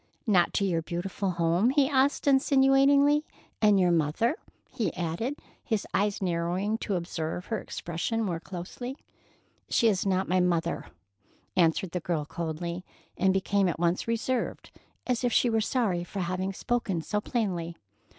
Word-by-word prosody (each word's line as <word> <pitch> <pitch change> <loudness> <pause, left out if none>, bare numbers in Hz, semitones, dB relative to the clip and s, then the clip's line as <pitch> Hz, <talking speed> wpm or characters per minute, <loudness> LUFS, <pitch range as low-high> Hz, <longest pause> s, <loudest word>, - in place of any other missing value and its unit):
"Not 185 -6 +3
to 200 - +2
your 170 -4 +1
beautiful 180 +4 -3
home?" 170 +5 +2
he 275 0 +3
asked 275 0 +2
insinuatingly. 280 +1 +4 0.4
"And 210 -2 +5
your 180 -1 +4
mother?" 170 - +1 0.4
he 240 -5 -1
added, 180 - -2 0.3
his 220 -4 -1
eyes 205 0 0
narrowing 180 +5 -1
to 205 - -2
observe 170 0 -3
her 225 - -2
expression 175 +7 -3
more 175 -5 -2
closely. 195 - -7 0.7
"She 235 - +3
is 195 -4 +1
not 190 -1 +1
my 185 +1 +2
mother," 170 -1 0 0.7
answered 170 0 +2
the 180 - -2
girl 160 -3 -2
coldly, 170 +2 -4 0.3
and 190 0 +3
became 195 +1 +1
at 165 - -3
once 175 +4 +1
reserved, 230 +2 -2 0.3
as 250 -1 -1
if 245 - +2
she 240 +1 +3
were 225 0 +2
sorry 210 -7 0
for 190 +3 -5
having 185 +2 -2
spoken 195 -5 -1
so 210 +4 -1
plainly. 180 -8 -2
190 Hz, 150 wpm, -28 LUFS, 175-230 Hz, 0.7 s, And